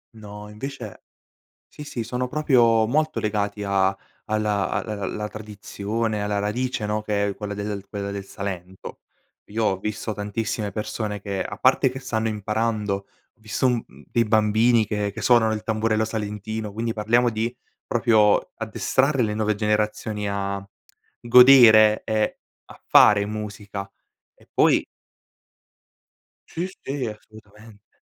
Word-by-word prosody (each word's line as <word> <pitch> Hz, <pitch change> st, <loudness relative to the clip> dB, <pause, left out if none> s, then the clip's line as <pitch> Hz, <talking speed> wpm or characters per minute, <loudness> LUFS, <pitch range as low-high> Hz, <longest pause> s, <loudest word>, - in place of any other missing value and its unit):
No, 105 Hz, -1 st, -10 dB
invece 110 Hz, -1 st, -8 dB, 0.6 s
sì, 150 Hz, -, -10 dB
sì 120 Hz, -5 st, -5 dB
sono 125 Hz, +2 st, -3 dB
proprio 120 Hz, -7 st, +3 dB
molto 155 Hz, +4 st, 0 dB
legati 105 Hz, -1 st, -2 dB
a 95 Hz, -1 st, +1 dB, 0.4 s
alla 105 Hz, -2 st, 0 dB
a -, -, -1 dB, 0.2 s
l -, -, -4 dB
la 105 Hz, 0 st, -3 dB
tradizione, 105 Hz, +1 st, -4 dB
alla 105 Hz, 0 st, -1 dB
radice, 110 Hz, +2 st, -2 dB
no, 105 Hz, +1 st, -1 dB
che 105 Hz, -1 st, 0 dB
è 100 Hz, -, -3 dB
quella 105 Hz, -1 st, -5 dB
del 100 Hz, -1 st, -5 dB
quella 100 Hz, -1 st, -4 dB
del 100 Hz, -1 st, -5 dB
Salento. 95 Hz, -2 st, -7 dB, 0.5 s
Io 110 Hz, +2 st, -1 dB
ho 95 Hz, -, +1 dB
visto 110 Hz, +2 st, -4 dB
tantissime 105 Hz, 0 st, -3 dB
persone 105 Hz, 0 st, -4 dB
che 100 Hz, -2 st, -3 dB
a 100 Hz, -, -7 dB
parte 130 Hz, +1 st, +3 dB
che 130 Hz, +1 st, -7 dB
stanno 115 Hz, -4 st, -2 dB
imparando, 105 Hz, 0 st, -1 dB
ho 100 Hz, -, -8 dB, 0.4 s
visto 110 Hz, +4 st, -2 dB
un 125 Hz, -2 st, +2 dB
dei 115 Hz, -, -2 dB
bambini 110 Hz, +1 st, +3 dB
che 105 Hz, -1 st, -2 dB
che -, -, -8 dB
suonano 120 Hz, -3 st, +4 dB
il 105 Hz, -, -4 dB
tamburello 110 Hz, 0 st, 0 dB
salentino, 110 Hz, 0 st, -4 dB
quindi 115 Hz, +2 st, -3 dB
parliamo 115 Hz, +3 st, +2 dB
di 115 Hz, +1 st, -2 dB, 0.3 s
proprio 110 Hz, -3 st, +3 dB
addestrare 135 Hz, -1 st, 0 dB
le 105 Hz, -1 st, -1 dB
nuove 110 Hz, 0 st, 0 dB
generazioni 105 Hz, 0 st, -1 dB
a 100 Hz, 0 st, -3 dB, 0.6 s
godere, 120 Hz, -3 st, +7 dB
e 110 Hz, -1 st, 0 dB, 0.3 s
a -, -, -15 dB
fare 100 Hz, -1 st, +6 dB
musica. 105 Hz, -2 st, -6 dB, 0.4 s
E -, -, -25 dB
poi -, -, +4 dB, 1.6 s
Sì 170 Hz, +3 st, -3 dB, 0.2 s
sì 135 Hz, -1 st, -3 dB
assolutamente. 105 Hz, 0 st, -14 dB
110 Hz, 140 wpm, -23 LUFS, 105-115 Hz, 1.6 s, godere